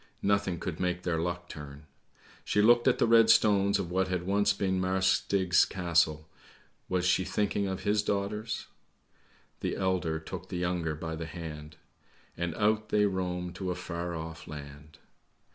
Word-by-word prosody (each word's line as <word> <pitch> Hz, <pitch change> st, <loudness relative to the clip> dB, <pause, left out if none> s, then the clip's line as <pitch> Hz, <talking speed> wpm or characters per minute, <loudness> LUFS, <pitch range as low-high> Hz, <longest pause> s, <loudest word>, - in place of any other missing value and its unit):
nothing 100 Hz, -3 st, +1 dB
could 85 Hz, -4 st, -5 dB
make 90 Hz, -1 st, -1 dB
their 85 Hz, -2 st, 0 dB
luck 85 Hz, +1 st, -3 dB
turn. 75 Hz, -1 st, -10 dB, 0.6 s
She -, -, 0 dB
looked 120 Hz, +4 st, +5 dB
at 130 Hz, -, +4 dB
the -, -, +3 dB
red 115 Hz, -1 st, +6 dB
stones 100 Hz, -3 st, +4 dB
of 85 Hz, -, -4 dB
what 95 Hz, +1 st, +1 dB
had 90 Hz, -1 st, -2 dB
once 100 Hz, +2 st, +2 dB
been 95 Hz, -1 st, 0 dB
Marsk 95 Hz, 0 st, +2 dB
Stig's 95 Hz, -2 st, +3 dB
Castle, 80 Hz, -4 st, +1 dB, 0.6 s
was 90 Hz, -1 st, 0 dB
she 90 Hz, +1 st, +3 dB
thinking 100 Hz, 0 st, -1 dB
of 95 Hz, 0 st, -4 dB
his 105 Hz, 0 st, +2 dB
daughters? 105 Hz, +2 st, -2 dB, 0.4 s
' -, -, -35 dB
The -, -, -1 dB
elder 90 Hz, -4 st, 0 dB
took 90 Hz, +3 st, -8 dB
the 90 Hz, -, -4 dB
younger 90 Hz, -3 st, -1 dB
by 80 Hz, +1 st, -5 dB
the 80 Hz, 0 st, -5 dB
hand, 75 Hz, -2 st, -8 dB, 0.6 s
And 85 Hz, -1 st, -3 dB
out 110 Hz, 0 st, +1 dB
they 105 Hz, 0 st, +3 dB
roamed 90 Hz, -2 st, -2 dB
to 95 Hz, -1 st, -3 dB
a 90 Hz, -, -1 dB
far 85 Hz, -1 st, -4 dB
off 80 Hz, 0 st, -7 dB
land.' 75 Hz, 0 st, -10 dB
90 Hz, 170 wpm, -29 LUFS, 85-100 Hz, 0.6 s, red